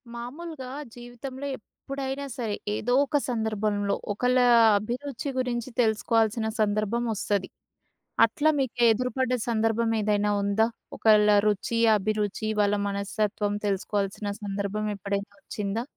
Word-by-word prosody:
మామూలుగా 270 Hz, +3 st, -7 dB, 0.3 s
జీవితంలో 245 Hz, +3 st, -7 dB
ఎప్పుడైనా 275 Hz, +4 st, -6 dB
సరే 225 Hz, -5 st, -2 dB, 0.2 s
ఏదో 245 Hz, +3 st, -1 dB
ఒక 290 Hz, +1 st, +1 dB
సందర్భంలో 215 Hz, -3 st, 0 dB, 0.2 s
ఒకళ్ళ 250 Hz, +4 st, +1 dB, 0.4 s
అభిరుచి 250 Hz, +5 st, -4 dB
గురించి 245 Hz, -1 st, -2 dB
తెలుసుకోవాల్సిన 220 Hz, 0 st, +1 dB
సందర్భం 215 Hz, +2 st, 0 dB
వస్తది. 200 Hz, -2 st, -1 dB, 0.8 s
అట్లా 290 Hz, +7 st, +1 dB
మీకు 260 Hz, -3 st, -2 dB
ఎదురుపడ్డ 250 Hz, +2 st, 0 dB, 0.2 s
సందర్భం 225 Hz, 0 st, +1 dB
ఏదైనా 210 Hz, 0 st, +1 dB
ఉందా? 200 Hz, +3 st, +2 dB, 0.3 s
ఒకళ్ళ 210 Hz, -1 st, +5 dB
రుచి, 210 Hz, +3 st, 0 dB, 0.2 s
అభిరుచి 210 Hz, +1 st, -1 dB
వాళ్ళ 205 Hz, 0 st, +2 dB
మనస్తత్వం 205 Hz, +1 st, -1 dB
తెలుసుకోవాల్సిన 200 Hz, +1 st, -1 dB
సందర్భం 200 Hz, +1 st, -2 dB
ఎప్పుడైనా 200 Hz, +1 st, -3 dB
వచ్చిందా? 205 Hz, +3 st, -3 dB
220 Hz, 105 wpm, -26 LUFS, 205-245 Hz, 0.8 s, ఒకళ్ళ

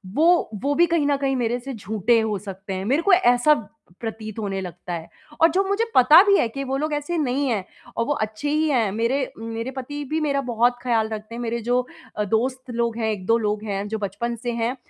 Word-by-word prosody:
वो 340 Hz, 0 st, +4 dB
वो 285 Hz, +1 st, +1 dB
भी 345 Hz, -, +5 dB
कहीं 335 Hz, -3 st, +1 dB
न 285 Hz, -, +3 dB
कहीं 275 Hz, -1 st, 0 dB
मेरे 245 Hz, -1 st, 0 dB
से 270 Hz, +2 st, -7 dB
झूठे 220 Hz, +1 st, +1 dB
हो 215 Hz, -2 st, -1 dB
सकते 195 Hz, 0 st, -7 dB
हैं। 190 Hz, +1 st, -4 dB
मेरे 270 Hz, +9 st, +2 dB
को 390 Hz, +2 st, +4 dB
ऐसा 275 Hz, -4 st, +5 dB, 0.5 s
प्रतीत 220 Hz, -1 st, -6 dB
होने 195 Hz, -2 st, -2 dB
लगता 180 Hz, -1 st, -7 dB
है 165 Hz, -1 st, -5 dB, 0.3 s
और 330 Hz, -, +7 dB
जो 380 Hz, +4 st, +2 dB
मुझे 400 Hz, +4 st, +1 dB
पता 300 Hz, +7 st, +8 dB
भी 400 Hz, -1 st, +4 dB
है -, -, +2 dB
कि 275 Hz, +4 st, -5 dB
वो 270 Hz, 0 st, -2 dB
लोग 305 Hz, +1 st, -2 dB
ऐसे 295 Hz, +4 st, -2 dB
नहीं 280 Hz, -1 st, 0 dB
है 210 Hz, -5 st, 0 dB, 0.3 s
और 230 Hz, -, +1 dB
वो 290 Hz, -, +1 dB
अच्छे 215 Hz, +4 st, -3 dB
ही 310 Hz, +1 st, +2 dB
हैं। 235 Hz, -8 st, +2 dB
मेरे 235 Hz, +6 st, 0 dB
मेरे 230 Hz, +2 st, -4 dB
पति 290 Hz, +3 st, -5 dB
भी 315 Hz, -, 0 dB
मेरा 280 Hz, -2 st, +1 dB
बहुत 240 Hz, +1 st, +2 dB
ख़्याल 230 Hz, -3 st, +1 dB
रखते 215 Hz, +1 st, -6 dB
हैं। 240 Hz, -, -5 dB
मेरे 235 Hz, 0 st, -2 dB
जो 245 Hz, +2 st, +1 dB, 0.4 s
अ, 210 Hz, -, +1 dB
दोस्त 250 Hz, +5 st, -1 dB
लोग 235 Hz, -1 st, -1 dB
हैं, 220 Hz, -1 st, 0 dB
1-2 210 Hz, +3 st, +1 dB
लोग 210 Hz, -1 st, -1 dB
हैं 200 Hz, -1 st, -3 dB
जो 220 Hz, -, -3 dB
बचपन 220 Hz, +4 st, -3 dB
से 240 Hz, -, -1 dB
हैं 235 Hz, +2 st, -1 dB
240 Hz, 235 wpm, -23 LUFS, 220-280 Hz, 0.5 s, पता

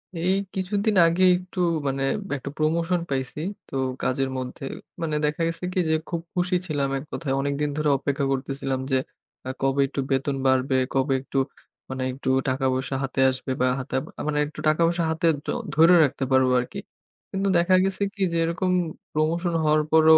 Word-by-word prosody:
এই 170 Hz, +3 st, +1 dB, 0.2 s
কিছুদিন 200 Hz, +3 st, 0 dB
আগে 170 Hz, +3 st, +2 dB
একটু 180 Hz, 0 st, -8 dB, 0.3 s
মানে 135 Hz, 0 st, -1 dB, 0.3 s
একটা 140 Hz, -, -6 dB
প্রমোশন 165 Hz, +3 st, +1 dB
পাইছি। 130 Hz, +1 st, -3 dB, 0.3 s
তো -, -, -8 dB, 0.3 s
কাজের 135 Hz, +1 st, 0 dB
মধ্যে, 130 Hz, +1 st, -6 dB, 0.4 s
মানে 155 Hz, -2 st, -1 dB
দেখা 150 Hz, +2 st, -1 dB
গেছে 165 Hz, +2 st, -5 dB
কি? 185 Hz, -, 0 dB
যে -, -, +3 dB, 0.2 s
খুব 170 Hz, -2 st, -2 dB
খুশি 180 Hz, +1 st, +1 dB
ছিলাম 145 Hz, -4 st, 0 dB
এক 135 Hz, -, -5 dB
কথায়। 140 Hz, -5 st, -2 dB
অনেকদিন 140 Hz, +1 st, -1 dB
ধরে 150 Hz, -1 st, +1 dB
অপেক্ষা 140 Hz, +1 st, -1 dB
করতেছিলাম। 135 Hz, 0 st, -2 dB
যে, 130 Hz, -, +4 dB, 0.5 s
আ -, -, -2 dB
কবে 135 Hz, +1 st, +2 dB
একটু 140 Hz, 0 st, -3 dB
বেতন 135 Hz, +1 st, +1 dB
বাড়বে? 130 Hz, 0 st, +2 dB, 0.2 s
কবে 135 Hz, +1 st, +2 dB
একটু 135 Hz, -, -5 dB, 0.5 s
মানে 130 Hz, 0 st, -3 dB
একটু 130 Hz, 0 st, -4 dB, 0.2 s
টাকা 130 Hz, +1 st, 0 dB
পয়সা 130 Hz, +1 st, -2 dB
হাতে 135 Hz, 0 st, -3 dB
আসবে? 130 Hz, +1 st, -5 dB
বা 130 Hz, -, +4 dB
হাতেব 130 Hz, 0 st, -2 dB, 0.2 s
আ -, -, -2 dB
মানে 150 Hz, -1 st, 0 dB
একটু 150 Hz, -, -11 dB
টাকা 155 Hz, +2 st, +3 dB
পয়সা 170 Hz, 0 st, 0 dB
হাতে 160 Hz, +1 st, -1 dB, 0.2 s
তো -, -, -1 dB, 0.2 s
ধরে 165 Hz, +3 st, +7 dB
রাখতে 140 Hz, -1 st, 0 dB
পারবো 130 Hz, -1 st, +4 dB
আরকি। 125 Hz, +11 st, -5 dB, 0.5 s
কিন্তু 195 Hz, 0 st, -1 dB
দেখা 175 Hz, +2 st, +4 dB
গেছে 195 Hz, +1 st, -1 dB
কি? 205 Hz, -, -10 dB
যে, -, -, +1 dB
এরকম 180 Hz, +3 st, 0 dB, 0.4 s
প্রমোশন 165 Hz, +3 st, 0 dB
হওয়ার 155 Hz, 0 st, +4 dB
পরও 160 Hz, 0 st, +7 dB
150 Hz, 180 wpm, -25 LUFS, 135-170 Hz, 0.5 s, ধরে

